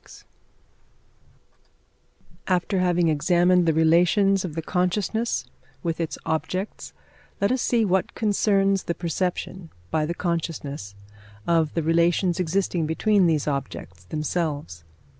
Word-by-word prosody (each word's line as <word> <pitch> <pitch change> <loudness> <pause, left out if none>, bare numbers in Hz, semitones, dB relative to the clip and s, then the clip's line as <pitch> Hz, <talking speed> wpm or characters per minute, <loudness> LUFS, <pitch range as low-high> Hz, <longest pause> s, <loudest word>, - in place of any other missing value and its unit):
After 185 +1 +1
having 175 -1 +2
examined 175 +3 +3
the 160 - +4
relations 175 +5 +3
of 170 -5 -5
the 165 - -3
consciousness 200 +7 -1 0.4
with 170 -1 -2
its 165 - -3
objects, 185 +5 -3 0.5
let 200 +3 +2
us 255 -1 0
see 230 -2 +2
what 190 -1 0
concerns 200 -2 +1
the 170 - -2
perception, 175 0 -3 0.2
by 155 -1 +1
the 170 - -3
consciousness, 150 - -4 0.5
of 165 -2 +1
the 165 - 0
relations 170 +3 +2
existing 180 -2 0
between 195 +3 +2
these 155 -3 0
objects 140 -2 -5
themselves. 150 - -3
175 Hz, 115 wpm, -24 LUFS, 160-190 Hz, 0.5 s, the